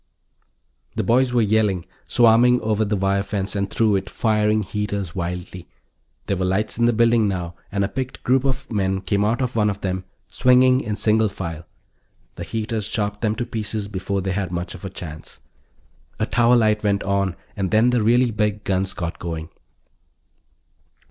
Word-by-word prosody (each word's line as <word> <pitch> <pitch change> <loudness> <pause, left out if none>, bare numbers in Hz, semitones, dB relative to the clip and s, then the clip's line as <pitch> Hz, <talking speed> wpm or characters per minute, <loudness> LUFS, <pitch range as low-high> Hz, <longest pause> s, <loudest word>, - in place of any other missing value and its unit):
The - - 0
boys 125 +2 +3
were 120 -2 +3
yelling, 105 -4 +1 0.2
swarming 120 +1 +5
over 110 0 +1
the 105 0 0
wire 100 0 +1
fence 100 0 -3
and 100 0 -1
through 110 -2 +2
it, 95 0 -5
firing 105 -1 +1
heaters 100 -3 -3
wildly. 90 0 -5 0.6
There 100 - 0
were 95 - -1
lights 105 +5 -1
in 120 - +4
the 120 - +4
buildings, 115 -1 +3
now, 90 -3 -3 0.2
and 100 0 0
a - - +1
picked 130 +5 -5
group 130 +1 +3
of 135 -2 -2
men 95 -3 0
came 100 +1 0
out 115 +5 +1
of 125 -1 -3
one 105 -2 +3
of 100 0 -4
them, 95 -1 -3 0.2
swinging 125 +1 +4
in 110 -4 -3
single 110 +1 +2
file; 85 -4 -6 0.7
the - - -7
heaters 110 -1 -3
chopped 105 -2 -2
them 110 -2 +1
to 120 - -3
pieces 110 -2 -3
before 100 0 -3
they 95 +1 -2
had 95 -2 -2
much 90 0 -4
of 90 - -11
a 95 - -4
chance. 80 -4 -9 0.8
A 110 - 0
tower 120 +1 +3
light 110 -2 +2
went 100 -1 +1
on 100 -2 0 0.2
and 95 -2 -1
then 110 +5 +4
the 120 -2 +2
really 120 +3 +3
big 105 -1 -1
guns 95 -1 -1
got 85 -1 -4
going. 80 -2 -5
105 Hz, 180 wpm, -22 LUFS, 95-115 Hz, 0.8 s, swarming